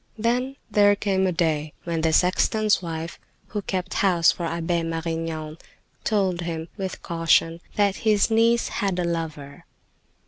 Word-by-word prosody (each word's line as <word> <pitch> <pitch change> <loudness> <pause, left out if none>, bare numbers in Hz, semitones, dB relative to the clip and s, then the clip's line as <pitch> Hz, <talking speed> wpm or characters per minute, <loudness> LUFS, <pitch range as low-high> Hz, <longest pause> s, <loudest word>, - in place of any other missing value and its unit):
Then 245 +4 0 0.2
there 205 -1 +5
came 190 -2 +1
a - - +1
day 155 -3 0
when 165 -2 -2
the 160 0 +2
sexton's 205 +5 +2
wife, 165 -1 -5 0.3
who 210 - -3
kept 185 -1 -3
house 180 -4 +4
for 170 - -4
Abbe 170 +1 -1
Marignan, 165 -1 -4 0.4
told 190 -5 +1
him, 165 -1 -4
with 190 -2 -5
caution, 165 0 +2
that 200 -2 +2
his 215 0 +2
niece 230 +1 +3
had 195 -3 -1
a 180 - 0
lover. 155 -4 -4
175 Hz, 145 wpm, -24 LUFS, 165-205 Hz, 0.4 s, there